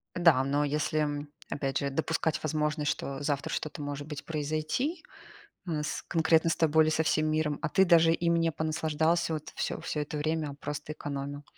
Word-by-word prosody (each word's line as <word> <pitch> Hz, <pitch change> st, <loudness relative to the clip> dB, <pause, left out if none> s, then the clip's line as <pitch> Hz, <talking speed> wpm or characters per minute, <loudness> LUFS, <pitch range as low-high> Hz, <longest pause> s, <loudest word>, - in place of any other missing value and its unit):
Да, 165 Hz, -7 st, +5 dB
но, 140 Hz, +2 st, +1 dB
если 150 Hz, 0 st, -1 dB, 0.2 s
опять 135 Hz, -2 st, -1 dB
же 140 Hz, -, -1 dB
допускать 160 Hz, +2 st, -1 dB
возможность, 150 Hz, -1 st, 0 dB
что 135 Hz, 0 st, -4 dB
завтра 145 Hz, +2 st, -1 dB
что-то, 155 Hz, 0 st, -3 dB
может 145 Hz, 0 st, -5 dB
быть, 150 Hz, -2 st, -7 dB
произойти, 155 Hz, -, -2 dB, 0.7 s
э, 155 Hz, -3 st, -1 dB
с 150 Hz, -, -3 dB
конкретно 165 Hz, 0 st, +3 dB
с -, -, +1 dB
тобой 160 Hz, -1 st, +4 dB
или 155 Hz, -, +2 dB
со 160 Hz, 0 st, +2 dB
всем 155 Hz, 0 st, +2 dB
миром, 155 Hz, -1 st, 0 dB
а 165 Hz, -, 0 dB
ты 190 Hz, +5 st, +4 dB
даже 165 Hz, -2 st, +6 dB
им 170 Hz, 0 st, +2 dB
не 165 Hz, 0 st, +2 dB
понаслаждался, 160 Hz, +1 st, 0 dB
вот, 155 Hz, -1 st, -6 dB
всё -, -, -2 dB
всё 150 Hz, -, -3 dB
это 150 Hz, +1 st, -4 dB
время, 155 Hz, +1 st, -1 dB
а -, -, -8 dB
просто 150 Hz, +1 st, -5 dB
экономил. 145 Hz, -1 st, -5 dB
155 Hz, 185 wpm, -29 LUFS, 145-160 Hz, 0.7 s, даже